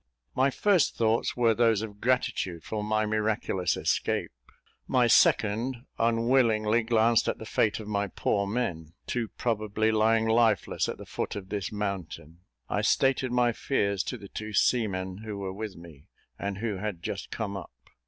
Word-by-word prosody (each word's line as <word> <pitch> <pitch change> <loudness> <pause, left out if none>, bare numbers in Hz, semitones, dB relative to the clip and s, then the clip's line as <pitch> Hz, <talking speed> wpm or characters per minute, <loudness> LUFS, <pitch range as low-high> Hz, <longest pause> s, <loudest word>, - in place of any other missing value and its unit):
My 130 +2 +3
first 185 +3 +2
thoughts 115 +1 +1
were 115 -2 +4
those 115 -2 +2
of 105 -2 -8
gratitude 105 -9 0
for 105 -1 -4
my 110 0 +1
miraculous 105 -4 0
escape; - - 0 0.6
my 125 -1 +3
second 115 +2 +3
unwillingly 115 -1 +3
glanced 115 0 +3
at - - 0
the 110 - -9
fate 110 -1 +1
of 110 - -8
my 100 -1 -1
poor 100 +1 -1
men, 90 -8 -3
too 120 -2 -2
probably 110 -1 -1
lying 110 +1 +3
lifeless 110 -3 +2
at - - -4
the - - -10
foot - - -4
of 95 -2 -7
this 100 -2 -3
mountain. 90 -6 -5 0.3
I - - -1
stated 135 -1 +2
my 120 -1 +3
fears 100 -7 0
to 125 - -4
the 100 -3 -11
two 110 +2 -7
seamen 95 -5 +1
who 110 -2 -6
were 95 -1 -4
with 105 0 -6
me, 85 -2 -14 0.3
and 100 -1 -3
who 105 -2 -2
had 95 -3 -5
just - - -4
come 100 -2 -4
up. 95 -4 -7
110 Hz, 165 wpm, -28 LUFS, 100-115 Hz, 0.6 s, were